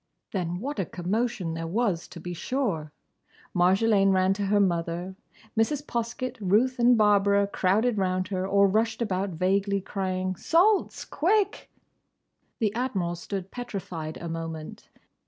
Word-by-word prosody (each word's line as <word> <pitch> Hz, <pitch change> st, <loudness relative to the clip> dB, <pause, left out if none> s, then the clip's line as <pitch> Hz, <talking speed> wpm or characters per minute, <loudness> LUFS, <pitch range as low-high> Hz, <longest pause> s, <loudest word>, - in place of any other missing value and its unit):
Then 175 Hz, -2 st, -2 dB
what 275 Hz, +3 st, -4 dB
a 190 Hz, -, 0 dB
commotion 185 Hz, 0 st, -2 dB
there 165 Hz, 0 st, -4 dB
was, 195 Hz, -2 st, 0 dB
to 175 Hz, -, -10 dB
be 175 Hz, +2 st, -6 dB
sure! 175 Hz, -, -2 dB, 0.6 s
Marjolaine 195 Hz, +2 st, +4 dB
ran 190 Hz, 0 st, +3 dB
to 200 Hz, 0 st, -2 dB
her 205 Hz, +1 st, +3 dB
mother, 175 Hz, 0 st, -1 dB, 0.4 s
Mrs. 275 Hz, +6 st, +1 dB
Poskett, 240 Hz, +1 st, -3 dB
Ruth 230 Hz, +7 st, +2 dB
and 240 Hz, 0 st, +5 dB
Barbara 200 Hz, -1 st, +4 dB
crowded 205 Hz, +4 st, +1 dB
round 185 Hz, -1 st, 0 dB
her 190 Hz, -1 st, -2 dB
or 200 Hz, 0 st, +4 dB
rushed 220 Hz, +3 st, +1 dB
about 195 Hz, -2 st, -1 dB
vaguely, 195 Hz, +3 st, +1 dB
crying, 185 Hz, -1 st, -2 dB
"Salts! 370 Hz, -, +2 dB
Quick!" 405 Hz, +5 st, 0 dB, 0.9 s
The 215 Hz, -4 st, 0 dB
Admiral 220 Hz, -8 st, -1 dB
stood 190 Hz, +2 st, -6 dB
petrified 185 Hz, -10 st, -5 dB
a 170 Hz, -, -6 dB
moment. 165 Hz, -1 st, -6 dB
195 Hz, 140 wpm, -27 LUFS, 180-225 Hz, 0.9 s, and